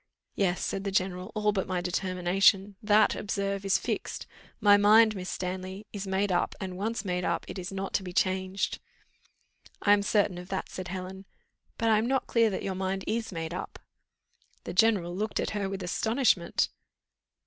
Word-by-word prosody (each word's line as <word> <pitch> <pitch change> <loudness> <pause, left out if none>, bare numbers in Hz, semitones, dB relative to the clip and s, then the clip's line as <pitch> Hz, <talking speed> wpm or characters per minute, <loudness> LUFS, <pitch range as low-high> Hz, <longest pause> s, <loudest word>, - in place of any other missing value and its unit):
"Yes," 185 -2 0
said 195 - -3
the 200 - -1
general, 185 0 -1
"all 210 0 +2
but 195 -2 -2
my 185 -1 -1
determination; 185 +2 +2
that, 210 0 +4
observe, 200 -1 -2
is 195 -1 +3
fixed. - - -4 0.3
My 205 -2 +7
mind, 215 +2 +6
Miss 185 -1 -5
Stanley, 185 +2 -5
is 200 -1 -5
made 190 +1 0
up, 175 - 0
and, 185 -2 -5
once 215 +4 -3
made 180 -1 -1
up, - - -1
it - - -6
is 180 +1 -5
not 195 0 -4
to 195 - +1
be 180 - -6
changed." 185 +1 0 1.0
"I 205 - +5
am 205 - +3
certain 200 -3 +1
of 180 +1 -10
that," 190 - -3
said 185 -1 -6
Helen, 190 +1 -6 0.5
"but 230 -1 +1
I 215 -1 +5
am 225 - 0
not 265 0 +1
clear 230 -2 +3
that 195 - -4
your 195 - -2
mind 190 +1 -2
is 225 0 -2
made 165 -2 -4
up." - - -6 0.9
The - - -6
general 185 -3 +3
looked 215 +3 -2
at - - -1
her 205 -2 -2
with 195 -1 -5
astonishment. 220 0 +1
195 Hz, 185 wpm, -28 LUFS, 185-205 Hz, 1.0 s, My